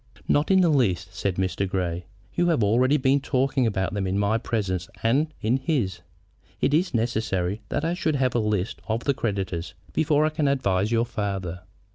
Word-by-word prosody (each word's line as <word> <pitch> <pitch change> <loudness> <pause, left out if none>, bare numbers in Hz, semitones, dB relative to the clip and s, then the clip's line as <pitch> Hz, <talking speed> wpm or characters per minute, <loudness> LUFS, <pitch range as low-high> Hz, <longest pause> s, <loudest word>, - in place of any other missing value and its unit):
"Not 145 +2 +2
in 190 -1 +5
the 175 - +4
least," 95 - +1
said 100 -1 -1
Mr. 95 +1 -1
Grey. 90 -2 -2 0.3
"You 175 0 +1
have 160 -10 +2
already 125 +7 +3
been 135 0 +3
talking 135 -1 +1
about 95 -3 -1
them 100 -2 -1
in 95 +1 0
my 105 +2 +2
presence 95 -6 -2
and 140 +7 +2
in 115 +4 +2
his. 130 - -1 0.6
It 140 - +1
is 165 -3 +2
necessary 110 -4 -1
that 145 - -1
I 165 - +1
should 160 -4 0
have 130 -2 +1
a 120 - +2
list 105 -3 -1
of 115 +1 -1
the 140 - +2
creditors 95 -7 -3 0.2
before 150 -1 +3
I - - +2
can 155 -1 0
advise 105 -7 +1
your 115 0 +2
father." 95 -6 -3
115 Hz, 190 wpm, -25 LUFS, 95-140 Hz, 0.6 s, in